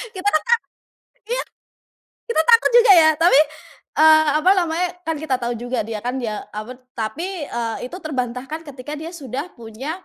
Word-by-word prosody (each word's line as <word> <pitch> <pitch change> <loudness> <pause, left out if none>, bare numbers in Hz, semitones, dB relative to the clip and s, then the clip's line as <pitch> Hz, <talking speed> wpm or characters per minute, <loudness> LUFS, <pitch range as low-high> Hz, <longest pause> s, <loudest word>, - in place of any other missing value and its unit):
Kita 375 +2 -4
kan 310 -6 +3
ta 465 - -6 0.8
iya. - - -2 0.9
Kita 470 - +1
takut 465 0 +6
juga 470 -4 +7
ya, 320 -3 +7
tapi, 330 -4 +5 0.6
eee, 315 0 +6
apa 345 +5 +3
namanya 345 -1 0
kan 325 -2 -2
kita 295 -4 -2
tahu 240 0 -1
juga 245 +1 -3
dia 220 0 -5
kan, 245 - -2
ya 215 -3 -4
apa 220 +4 -7
tuh 255 - -34
tapi, 225 +9 -4 0.2
eee, 230 -1 -3
itu - - -7
terbantahkan 265 -1 -4
ketika 275 +1 -9
dia 320 +1 -6
sudah 285 -1 -6
punya 265 +11 -7
305 Hz, 175 wpm, -21 LUFS, 245-340 Hz, 0.9 s, juga